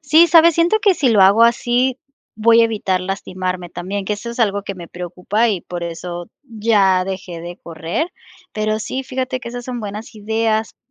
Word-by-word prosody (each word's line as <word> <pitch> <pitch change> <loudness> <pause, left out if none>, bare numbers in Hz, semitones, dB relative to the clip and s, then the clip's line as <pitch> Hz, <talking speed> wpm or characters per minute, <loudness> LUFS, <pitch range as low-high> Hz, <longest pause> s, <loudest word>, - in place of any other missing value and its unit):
Sí, 310 +3 +5
¿sabes? 335 -1 +6
Siento 340 +6 +3
que 400 -2 +4
si 280 -6 +1
lo 220 -4 +4
hago 200 +4 +6
así 245 +2 +2 0.4
voy 230 +1 +6
a - - +6
evitar 205 -5 -1
lastimarme 185 -1 -4
también, 190 +4 -5
que 210 - -2
eso 235 +3 -5
es 235 - -9
algo 205 -3 +1
que 195 - -5
me 175 -2 -9
preocupa 180 +6 -1
y 195 -5 -1
por 175 +1 -7
eso 175 +1 -6 0.2
ya 210 -6 +2
dejé 185 -3 -6
de 175 +1 -8
correr, 170 - -4 0.4
pero 215 0 -1
sí, 260 +5 -4
fíjate 255 0 -3
que 235 - -7
esas 245 0 -7
son 245 -2 -5
buenas 210 +2 -7
ideas 220 +1 -1
215 Hz, 195 wpm, -19 LUFS, 185-240 Hz, 0.4 s, sabes